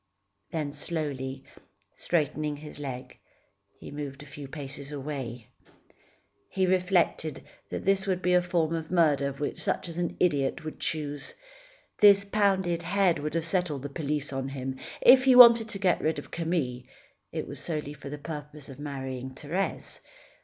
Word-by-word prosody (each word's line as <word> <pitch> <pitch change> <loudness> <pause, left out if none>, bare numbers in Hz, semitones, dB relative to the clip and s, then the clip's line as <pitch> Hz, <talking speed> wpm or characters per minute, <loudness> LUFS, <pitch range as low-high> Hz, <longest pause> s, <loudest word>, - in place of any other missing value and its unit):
Then 150 -3 -3
slowly, 140 -4 -4 0.5
straightening 150 -2 -1
his 150 0 -9
leg, 130 -3 -7 0.6
he - - -9
moved 145 -1 -6
a - - -12
few 145 -1 -9
paces 140 0 -6
away. 135 -5 -5 1.0
He 190 -1 +1
reflected 180 -4 +1 0.3
that - - -5
this 195 0 +2
would 185 -2 +1
be 180 0 +1
a 180 - +5
form 170 -2 0
of 160 -1 -3
murder 150 -6 +3 0.2
such - - -1
as 170 0 -6
an 175 -1 -2
idiot 145 -5 +1
would 155 - -6
choose. 145 -3 -3 0.6
This 200 -1 +7
pounded 190 -4 +1
head 180 -1 +2
would 150 +2 -4
have 165 -1 0
set 180 0 +1
all 145 - -3
the 140 +2 -6
police 145 -1 -3
on 135 0 -2
him. 130 -1 -5 0.2
If 260 +1 +8
he 260 -1 +6
wanted 235 -2 +9
to 205 - -4
get 190 -3 +2
rid 160 +1 0
of - - -8
Camille, 160 -7 -1 0.5
it - - -4
was - - -5
solely 150 -3 -3
for 145 -1 -9
the 150 - -5
purpose 150 -1 -8
of 135 0 -10
marrying 130 -3 -5
Thérèse. 175 +8 -3
150 Hz, 160 wpm, -28 LUFS, 140-180 Hz, 1.0 s, wanted